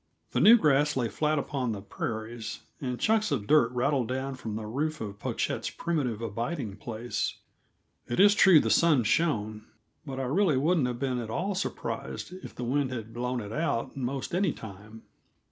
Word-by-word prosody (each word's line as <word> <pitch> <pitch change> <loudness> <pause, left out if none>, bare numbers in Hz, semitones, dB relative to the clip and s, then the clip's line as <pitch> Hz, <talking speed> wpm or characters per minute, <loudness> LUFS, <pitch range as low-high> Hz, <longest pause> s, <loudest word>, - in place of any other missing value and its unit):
The - - 0
new 235 +3 +9
grass 150 - +3
lay 120 -3 0
flat 155 +4 0
upon 130 -4 -1
the 100 - -6
prairies, 110 +1 -5 0.2
and 125 -3 -3
chunks 220 -1 +2
of 120 -8 -1
dirt 120 -2 +4
rattled 125 0 +1
down 130 +2 -2
from 115 -5 -6
the 110 0 -4
roof 150 +8 -2
of 100 -2 -6
Pochette's - - -2
primitive 130 -10 -2
abiding 115 - -3
place. 115 +2 -3 0.7
It 120 - -2
is 205 +1 +8
true 190 -6 +7
the 110 -5 0
sun 150 +1 +4
shone, 110 -5 0 0.4
but 135 -3 -6
I - - -1
really 155 +3 +2
wouldn't 155 0 +2
have 125 -1 -3
been 130 -1 -1
at 115 -2 -5
all 190 - -1
surprised 185 -1 -4
if - - -9
the 125 - -5
wind 130 +2 0
had 115 -3 -6
blown 125 +1 -2
it 105 -1 -7
out, 155 -6 -1
'most 135 +2 -3
any 180 -2 +2
time. 105 +1 -11
125 Hz, 180 wpm, -28 LUFS, 115-150 Hz, 0.7 s, new